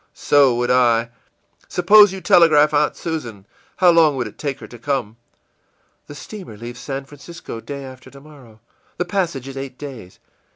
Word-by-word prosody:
î - - -39
ìSo 135 -4 +3
would 120 +1 0
I. 120 -2 +2 0.6
Suppose 205 +3 +5
you 190 0 -7
telegraph 160 -6 +4
Aunt 150 0 +1
Susan. 120 - -6 0.3
How 180 -2 +5
long 160 -4 +4
would 125 -2 -2
it - - -11
take 140 -3 -4
her - - -10
to 120 - -13
come?î 120 0 -8
ìThe - - -9
steamer 185 - -10
leaves 120 +2 -9
San 135 -1 -6
Francisco 145 -3 -10
day 140 +2 -7
after 130 0 -12
tomorrow. 140 -5 -16 0.4
The 180 - -1
passage 175 -8 -3
is 135 0 -8
eight 135 -1 -7
days. 130 -11 -10
140 Hz, 170 wpm, -20 LUFS, 120-160 Hz, 0.6 s, Suppose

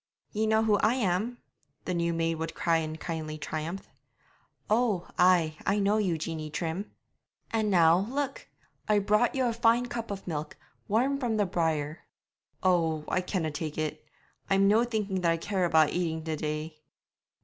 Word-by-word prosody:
'Ye 220 +1 0
know 220 0 +3
who 215 -2 +3
I 215 +4 +2
am?' 220 +1 0 0.5
the 180 - -1
new 170 -1 0
maid 165 0 0
would 160 - -4
cry 165 -1 +2
in 155 -1 -3
kindly 160 -1 -5
triumph. 160 +5 -5 0.8
'Oh, 215 -5 +1
ay, 175 -4 +4
I 200 - +1
know 205 +1 +2
you, 180 -6 +1
Jeanie 155 -1 -4
Trim.' 170 +6 -3 0.6
'And 220 -2 +1
now, 175 +1 +4
look, 275 +1 -3 0.4
I 210 - +5
brought 210 +5 +2
you 260 -1 +1
a 235 - +1
fine 235 +1 +3
cup 240 -2 -5
of 200 -1 -5
milk, 155 -3 -4 0.3
warm 260 +7 +1
from 235 -5 0
the 205 - +3
byre.' 160 -4 -1 0.6
'Oh, 165 -4 +2
I 185 - +1
canna 180 -4 -2
tak' 150 0 -5
it; 155 0 -3 0.5
I'm 195 0 +4
no 215 +3 +5
thinking 210 -5 -2
that 170 -1 +3
I - - -1
care 185 +2 -1
about 160 -3 +4
eating 160 -3 -1
the 160 -1 -2
day.' 155 +1 -4
180 Hz, 170 wpm, -29 LUFS, 160-215 Hz, 0.8 s, I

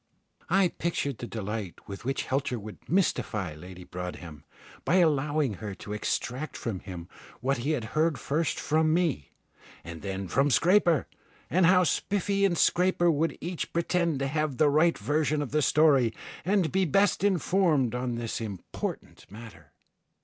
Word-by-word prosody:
I 190 0 +4
pictured 165 -6 -3
the 120 - -5
delight 105 -4 -5
with 100 +3 -8
which 135 +1 -1
Helter 135 -2 -1
would 105 -1 -11
mystify 110 - 0
Lady 90 +4 -11
Broadhem, 90 -4 -7 0.4
by 175 - +2
allowing 150 - +2
her 105 -3 -5
to 105 - -7
extract 125 +6 -3
from 110 -6 -4
him 90 -3 -8 0.3
what 135 +4 0
he 145 +6 0
had 130 -7 -2
heard 155 -1 +2
first 155 +4 -1
from 155 +1 +2
me 160 - 0 0.5
and 85 -1 -8
then 95 -1 -4
from 135 +9 +2
Scraper, 170 - +4 0.5
and 180 -1 +4
how 185 0 +5
Spiffy 200 +3 +1
and 175 -3 +1
Scraper 175 -1 +3
would 160 +2 0
each 175 0 -4
pretend 170 -2 +1
to 135 0 -1
have 150 -2 -1
the 150 - +4
right 165 +3 +3
version 155 0 0
of 145 -4 -3
the 150 +1 +2
story, 140 -5 +4 0.3
and 190 -2 +1
be 190 0 +2
best 190 +3 +2
informed 175 - +2
on 125 -1 -2
this 115 0 -4
important 100 -5 -6
matter. 100 -9 -12
145 Hz, 155 wpm, -28 LUFS, 110-170 Hz, 0.5 s, how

